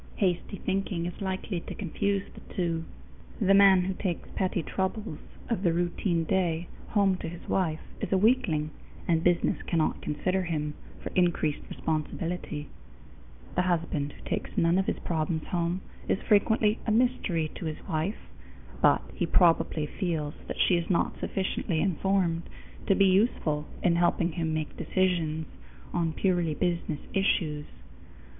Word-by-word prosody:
Hasty 190 +1 0
thinking 190 -3 -1
is 175 +2 -6
likely 190 -1 -2
to - - -8
confuse 200 +1 -1
the - - -13
two. 165 -3 0 0.5
The 195 -2 +4
man 195 -2 +7
who 190 +1 -1
takes 185 -2 -3
petty 185 -3 0
troubles 190 0 -2 0.3
of 230 -6 -1
the 175 -4 +3
routine 175 0 0
day 170 -1 0 0.2
home 200 -3 +3
to - - -5
his 170 0 -10
wife 165 -5 0 0.2
is - - -3
a 190 - +4
weakling, 185 -9 +2 0.4
and 165 -1 +2
business 175 -1 +2
cannot 165 -3 +1
consider 185 +5 0
him 150 -4 -2 0.3
for - - -4
increased 170 -4 +2
responsibility. 155 -1 -3 0.9
The 180 - +2
husband 165 -5 0
who - - -13
takes - - -2
none 170 +2 +4
of 190 - 0
his - - 0
problems 160 -1 -1
home 175 +1 0 0.3
is - - +2
frequently 215 +1 +4
a - - +3
mystery 215 -9 +1
to - - -6
his 155 +4 -5
wife, 165 +3 -2 0.5
but - - +5
he 175 - -1
probably 165 -3 +3
feels 155 -3 -2
that - - -4
she 180 - +4
is 170 - -3
not 180 - +1
sufficiently 190 -3 -1
informed 185 -2 +1 0.4
to 195 - +5
be 195 - +5
useful 185 -7 +2 0.2
in 170 -1 +4
helping 175 0 +2
him 160 0 -1
make 155 -1 -2
decisions 165 -3 0 0.5
on 165 -2 +1
purely 175 -3 +1
business 170 -4 -1
issues. 155 -6 +1
175 Hz, 150 wpm, -28 LUFS, 160-190 Hz, 0.9 s, man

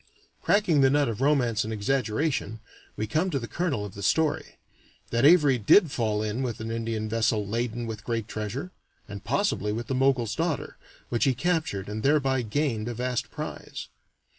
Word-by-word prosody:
Cracking 185 -8 +3
the 135 - +6
nut 145 0 +3
of 115 +1 -3
romance 130 -6 +2
and 110 - -5
exaggeration, 115 +1 -1 0.4
we 110 - -1
come 155 - 0
to 150 - -1
the 120 -3 -4
kernel 150 -11 -1
of 100 - -8
the 100 - -8
story 155 +9 0 0.5
that 120 +3 +2
Avary 145 -8 +5
did 170 - +6
fall 110 -5 0
in 110 +4 -2
with 125 -2 -3
an 110 +1 -4
Indian 115 -1 -2
vessel 110 -1 +1
laden 115 +2 -2
with 110 -1 -6
great 115 -2 -2
treasure 110 - -4 0.4
(and 100 -1 -8
possibly 135 - 0
with 115 +3 -3
the 135 - -3
Mogul's 130 -4 +2
daughter), 160 -3 -2 0.3
which 120 +2 +1
he 135 -2 +2
captured, 155 - -1
and 105 +1 -4
thereby 135 -1 +2
gained 115 -1 -1
a 120 - -4
vast 125 0 -2
prize. - - -7
120 Hz, 180 wpm, -27 LUFS, 110-140 Hz, 0.5 s, the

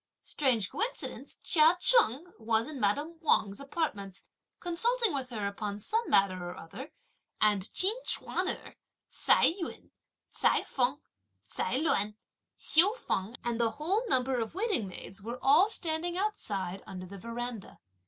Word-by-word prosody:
Strange 240 -9 +1
coincidence 455 +5 -4
Chia 325 +1 +6
Cheng 355 - +4
was 225 +1 +1
in 305 -3 -7
madame 290 +11 0
Wang's 205 -10 +2
apartments 275 - -4 0.4
consulting 455 +5 0
with 265 -2 -3
her 215 -5 -4
upon 200 0 -4
some 450 - -1
matter 185 -2 +3
or 175 - -6
other, 255 - -9 0.5
and 205 -3 +2
Chin 385 +4 +3
Ch'uan - - 0
erh, - - -4 0.4
Ts'ai - - +4
Yun, 335 - -7 0.4
Ts'ai - - +2
Feng, 260 +2 0 0.5
Ts'ai 215 - -1
Luan, 210 -9 +1 0.4
Hsiu 370 +8 +4
Feng 200 - -3
and 240 -1 -2
the 230 - +3
whole 350 +9 0
number 255 -3 +2
of 225 +6 -4
waiting 400 - 0
maids 190 +1 -9
were 235 +4 -5
all 305 +10 +5
standing 345 -2 -2
outside 200 - -2
under 185 -1 -7
the 195 +2 -10
verandah. 230 0 -6
255 Hz, 145 wpm, -30 LUFS, 205-340 Hz, 0.5 s, Chia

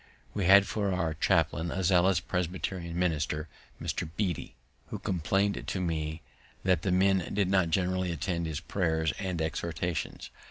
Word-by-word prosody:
We 100 -3 -1
had 100 +2 +8
for 100 -2 -1
our 85 -4 0
chaplain 80 +2 +1
a 95 +3 -2
zealous 90 0 +4
Presbyterian 90 -1 -3
minister, 75 -3 0 0.3
Mr. - - -3
Beatty, 90 -10 -2 0.3
who - - -5
complained 95 +3 0
to 95 - -2
me 80 -2 -2 0.4
that 90 -4 +3
the 95 - 0
men 95 0 +3
did 100 -2 +2
not 95 -4 +3
generally 95 +1 +1
attend 85 +1 -2
his 75 -2 -3
prayers 80 -4 0
and 95 -4 -2
exhortations. 80 -1 -3
90 Hz, 150 wpm, -30 LUFS, 80-95 Hz, 0.4 s, had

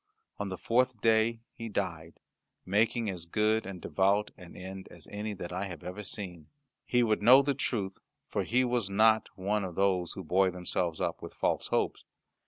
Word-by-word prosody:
On 100 - -2
the 95 - -4
fourth 125 +2 +1
day 115 +1 +3
he 115 -1 -6
died, 85 -5 -4 0.5
making 110 +4 +2
as 90 -4 -4
good 110 +3 +1
and 95 -2 -6
devout 100 +4 +1
an 90 -4 -13
end 95 +1 -8
as - - -12
any 105 0 -4
that 90 -1 -6
I 95 +2 -2
have 90 -5 -8
ever 90 +4 -6
seen. 90 -5 -4 0.4
He 125 -1 +3
would 110 -2 +1
know 130 +6 +8
the 140 0 +1
truth, 105 -8 -2 0.3
for - - -1
he 125 +3 +2
was 120 -5 0
not 110 +2 +4
one 100 +2 0
of 90 -3 -5
those 95 -3 +2
who 95 - -7
buoy 95 +3 +3
themselves 90 -2 -2
up - - -2
with - - -9
false - - 0
hopes. - - -1
100 Hz, 190 wpm, -30 LUFS, 90-110 Hz, 0.5 s, know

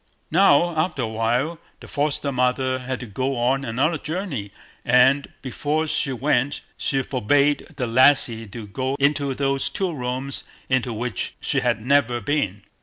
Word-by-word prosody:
Now, 175 -1 +4
after 155 -4 0
a - - -1
while, 120 +9 -1 0.2
the - - -12
foster 145 -1 -1
mother 130 0 +1
had 130 0 -4
to - - -5
go 130 +5 -2
on 130 +3 +1
another 140 +7 0
journey; 155 - -4 0.3
and, 130 +3 +4
before 150 +4 -1
she 145 -2 0
went, 130 +1 0
she 135 -1 -1
forbade 140 +4 +1
the 130 - -2
lassie 120 -2 +4
to 105 +2 -8
go 130 +6 -3
into 140 -1 +1
those 135 0 0
two 185 +4 -2
rooms 130 0 -3 0.3
into 130 -1 +1
which 115 -2 -4
she - - 0
had 120 -2 -1
never 130 -3 +3
been. 105 -6 -1
130 Hz, 155 wpm, -23 LUFS, 120-145 Hz, 0.3 s, Now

